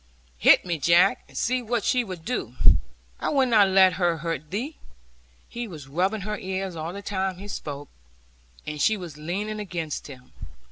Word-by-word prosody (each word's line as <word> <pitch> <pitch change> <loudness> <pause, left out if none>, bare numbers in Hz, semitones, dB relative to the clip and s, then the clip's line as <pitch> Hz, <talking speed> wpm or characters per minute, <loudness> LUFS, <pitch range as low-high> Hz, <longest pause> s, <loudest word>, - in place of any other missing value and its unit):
'Hit - - +6
me, 170 -3 -2
Jack, 170 - +4
and - - -12
see 255 +2 +1
what 235 -2 -1
she 250 -1 +2
will 190 -5 -5
do. 165 - -4 0.6
I - - -1
will 275 -2 +3
not 220 -5 +5
let 190 -1 +6
her 170 -2 +2
hurt 155 -2 -4
thee.' 250 - -4 0.7
He 235 0 -5
was 155 -8 -9
rubbing 185 +9 0
her 210 +2 -4
ears 190 -1 -3
all 160 +1 -4
the 200 +2 -8
time 190 -2 -2
he 200 +2 -9
spoke, 145 -7 -6 0.8
and 150 -1 -4
she 220 +6 +3
was 175 -6 -8
leaning 200 +7 -3
against 170 -7 -4
him. 130 -3 -13
190 Hz, 180 wpm, -25 LUFS, 160-215 Hz, 0.8 s, Hit